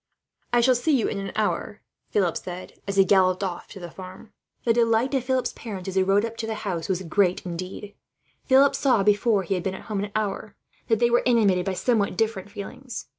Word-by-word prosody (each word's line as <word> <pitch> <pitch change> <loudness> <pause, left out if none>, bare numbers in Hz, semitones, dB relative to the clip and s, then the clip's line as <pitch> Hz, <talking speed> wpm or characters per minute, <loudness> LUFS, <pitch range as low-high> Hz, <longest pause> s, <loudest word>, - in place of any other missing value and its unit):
"Then 240 - +3
I - - +5
shall 255 +2 +5
see 270 +4 +2
you 230 - 0
in 200 - -3
an 195 - -5
hour." 210 -1 -2 0.3
And 185 -5 +3
Philip 190 +2 -2
galloped 185 -1 +3
off 180 -3 -4
to - - -11
the 175 -2 -8
farm. 185 +4 -11 0.3
The 230 - +3
delight 230 +3 +2
of 265 -3 +1
Philip's 260 -1 0
parents, 195 -5 -6
as - - -5
he 190 - +3
rode 195 +3 +3
up 230 0 -7
to 225 - -4
the 220 - -2
house, 175 -4 -3
was 190 0 -1
great 180 +2 +1
indeed. 185 +4 -6 0.5
Philip 270 +1 +5
saw, 250 -7 +2
before 205 0 +3
he 180 - -2
had 180 - -1
been 190 +1 -3
at - - -9
home 200 -1 -1
an 205 - -5
hour, 210 0 -3 0.3
that 225 -2 +3
they 240 +1 +2
were 240 - +4
animated 205 -7 +3
by 195 - 0
somewhat 215 0 0
different 215 -3 -1
feelings. 250 +6 -8
205 Hz, 220 wpm, -25 LUFS, 190-230 Hz, 0.5 s, I